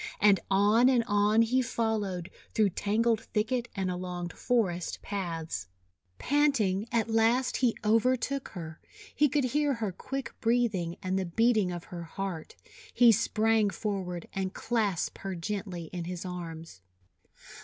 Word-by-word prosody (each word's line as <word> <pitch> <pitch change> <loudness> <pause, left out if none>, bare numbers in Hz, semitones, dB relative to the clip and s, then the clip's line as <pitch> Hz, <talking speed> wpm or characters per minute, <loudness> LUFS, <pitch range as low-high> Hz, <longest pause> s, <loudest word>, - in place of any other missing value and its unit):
And 205 -2 +5
on 210 +6 +5
and 250 -3 +3
on 210 +1 +3
he 255 +3 +2
fol 225 -2 0
lowed, 185 -4 -4 0.2
through 215 -3 +3
tangled 220 +4 +1
thicket 235 +3 -1
and 190 -2 -1
along 180 -1 -4
forest 185 -7 -1
paths. 165 - -4 0.5
Panting, 240 -9 +1
at 230 -2 +1
last 230 +3 +2
he 245 -3 +1
overtook 250 +5 +2
her. 160 -3 -7 0.3
He 295 -1 +3
could 285 +1 +1
hear 285 +2 +1
her 220 -4 -2
quick 270 +8 -5
breathing 225 -8 +1
and 190 +1 0
the 190 - -1
beating 215 0 +2
of 175 -1 -5
her 175 -1 -8
heart. 170 0 -5 0.4
He 240 -1 +6
sprang 220 0 +2
forward 190 -5 -4
and 190 -1 -3
clasped 210 -7 -1
her 195 -1 -4
gently 190 0 -4
in 175 -2 -4
his 180 +1 -5
arms. 165 - -7
205 Hz, 145 wpm, -29 LUFS, 180-230 Hz, 0.5 s, He